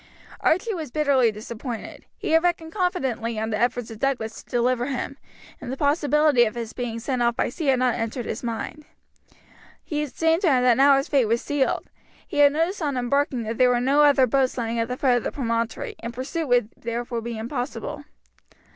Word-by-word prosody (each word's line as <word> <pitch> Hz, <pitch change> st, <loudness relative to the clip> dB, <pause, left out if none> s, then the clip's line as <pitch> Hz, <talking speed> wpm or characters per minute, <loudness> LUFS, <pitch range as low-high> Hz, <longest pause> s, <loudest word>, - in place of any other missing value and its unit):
Archie 385 Hz, +7 st, +1 dB
was 320 Hz, -6 st, -5 dB
bitterly 270 Hz, -4 st, +3 dB
disappointed. 225 Hz, +2 st, -7 dB
He -, -, -4 dB
had 325 Hz, 0 st, +5 dB
reckoned 335 Hz, -2 st, -1 dB
confidently 265 Hz, -, -1 dB
on 220 Hz, +1 st, -2 dB
the 215 Hz, -, -1 dB
efforts 245 Hz, -1 st, 0 dB
of 220 Hz, -, -9 dB
Douglas 240 Hz, -5 st, -2 dB
to -, -, -27 dB
deliver 245 Hz, 0 st, +1 dB
him, 275 Hz, 0 st, -3 dB, 0.5 s
and 255 Hz, -, -6 dB
the 265 Hz, -, -4 dB
possibility 295 Hz, -2 st, +3 dB
of 215 Hz, -, -4 dB
his 230 Hz, -2 st, -5 dB
being 235 Hz, -2 st, -4 dB
sent 250 Hz, +1 st, -2 dB
off 235 Hz, 0 st, +2 dB
by -, -, 0 dB
sea 300 Hz, +5 st, -4 dB
had 265 Hz, -1 st, +4 dB
not 250 Hz, -1 st, +2 dB
entered 230 Hz, +1 st, -3 dB
his -, -, -4 dB
mind. 240 Hz, +6 st, -5 dB, 1.0 s
It 300 Hz, -3 st, -3 dB
seemed 325 Hz, +2 st, +2 dB
to 345 Hz, -, +3 dB
him 250 Hz, -2 st, +3 dB
now 280 Hz, +1 st, +6 dB
that -, -, +5 dB
his 275 Hz, -, -1 dB
fate 275 Hz, -5 st, +3 dB
was 230 Hz, +2 st, 0 dB
sealed. 290 Hz, -2 st, 0 dB, 0.4 s
He 310 Hz, -, -6 dB
had 285 Hz, -1 st, +7 dB
noticed 330 Hz, +6 st, -1 dB
on 285 Hz, -4 st, -1 dB
embarking 250 Hz, 0 st, 0 dB
that 225 Hz, +1 st, -4 dB
there 250 Hz, -1 st, +6 dB
were 245 Hz, -1 st, +2 dB
no 275 Hz, +4 st, +3 dB
other 285 Hz, -3 st, +6 dB
boats 260 Hz, +1 st, +1 dB
lying 230 Hz, -1 st, -2 dB
at 230 Hz, -, 0 dB
the 250 Hz, +1 st, -4 dB
foot 255 Hz, -3 st, +3 dB
of 240 Hz, -, -3 dB
the -, -, -2 dB
promontory, 230 Hz, -3 st, -2 dB
and 235 Hz, -, -5 dB
pursuit 270 Hz, +6 st, -4 dB
would 245 Hz, -4 st, +2 dB
therefore 235 Hz, 0 st, -4 dB
be 235 Hz, 0 st, -5 dB
impossible. 245 Hz, +3 st, -4 dB
255 Hz, 210 wpm, -24 LUFS, 235-290 Hz, 1.0 s, had